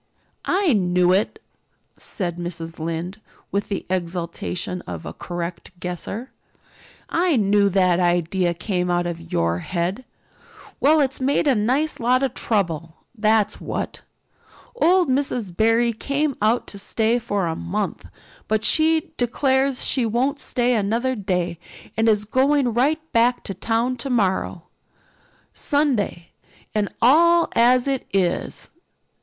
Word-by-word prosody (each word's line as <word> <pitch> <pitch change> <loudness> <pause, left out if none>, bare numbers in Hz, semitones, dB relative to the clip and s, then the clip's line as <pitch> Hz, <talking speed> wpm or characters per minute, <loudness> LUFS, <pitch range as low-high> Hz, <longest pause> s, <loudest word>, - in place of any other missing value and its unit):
"I 375 -6 +3
knew 180 -3 +3
it!" 195 +3 +1 0.6
said 175 -4 -4
Mrs. 170 -2 -6
Lynde, 165 +5 -4 0.3
with 200 0 -2
the 195 - -3
exultation 180 0 -3
of 85 -2 -6
a - - -6
correct 175 +1 -6
guesser. 185 +8 -5 0.8
"I 340 -1 +1
knew 205 -2 +3
that 185 -2 +3
idea 175 0 +1
came 180 -1 -2
out 175 0 +1
of 170 -1 -6
your 85 +1 +1
head. 185 - -2 0.8
Well, 305 +2 +4
it's 270 -1 -1
made 275 +4 +2
a 280 - +4
nice 255 +8 0
lot 250 +2 +2
of 270 - 0
trouble, 170 -7 -1 0.2
that's 215 -1 +1
what. - - -4 0.7
Old 370 -6 +4
Miss 255 -6 -1
Barry 225 +5 +2
came 280 +5 -1
out 220 +3 +2
to 200 - -8
stay 225 +4 +1
for 205 -4 -1
a 165 - -2
month, 85 0 -3 0.4
but 215 0 0
she 320 +1 +3
declares 265 +2 +1
she 260 - +2
won't 250 +6 0
stay 245 -3 +1
another 230 +4 0
day 180 -6 -2 0.4
and 225 +1 +3
is 210 -1 +2
going 260 +2 +2
right 305 +7 0
back 240 +2 +2
to 195 - -5
town 230 +6 -1
tomorrow, 195 -9 -1 0.9
Sunday 260 - 0 0.4
and 210 -2 0
all 335 +6 +5
as 245 +2 +4
it 270 -2 -1
is. 185 -3 -1
215 Hz, 130 wpm, -22 LUFS, 180-260 Hz, 0.9 s, all